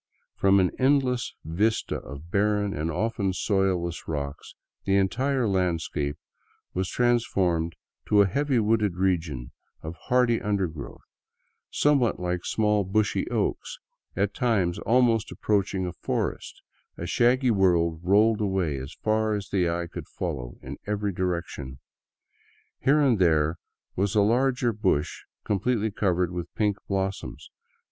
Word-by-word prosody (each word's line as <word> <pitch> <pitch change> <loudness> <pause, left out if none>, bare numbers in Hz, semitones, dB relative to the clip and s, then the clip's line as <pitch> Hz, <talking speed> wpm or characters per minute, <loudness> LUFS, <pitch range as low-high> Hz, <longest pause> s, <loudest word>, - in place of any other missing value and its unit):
Front 100 0 +4
an 90 -1 +2
endless 130 -2 +2
vista 105 +8 0
of 70 +5 -10
barren 105 0 +1
and 75 +2 -2
often 100 +2 -1
soilless 95 -4 0
rocks, 70 -2 -5 0.3
the 95 - +1
entire 125 +6 +1
landscape 85 -6 -1 0.6
was 95 0 -1
trans 120 -1 +2
formed 85 -6 0 0.3
to 105 -1 +5
a - - +2
heavily 140 +6 0
wooded 105 -4 +2
region 85 -9 -1 0.3
of 80 +1 -6
hardy 125 -2 +3
titidergrowth, 95 -8 -3 0.7
somewhat 140 -5 +2
like 90 0 -2
small, 105 -2 +1
bushy 105 +3 0
oaks, - - -2 0.4
at 100 +2 0
times 100 -9 +1
almost 115 -2 +2
approaching 100 -2 0
a 90 - -4
forest, - - -3 0.3
a 85 - -5
shaggy 125 +6 +3
world 85 -5 +2
rolling 105 +4 +3
away 95 -8 0
as 65 +3 -7
far 110 0 +1
as 100 -2 -5
the 90 -3 +1
eye 85 +1 -2
could 85 - -8
follow - - -5
in 65 +2 -7
every 105 -1 -1
direction. 85 -8 -3 1.0
Here 145 +3 +3
and 130 -7 +3
there 80 -2 +2 0.4
was 100 +2 0
a 105 - +5
larger 125 +2 +2
bush 95 -9 -1 0.2
completely^'covered 100 -5 0
with 85 -1 -5
pink 105 -2 +1
blos 95 0 -1
soms. - - -10
100 Hz, 135 wpm, -26 LUFS, 85-110 Hz, 1.0 s, to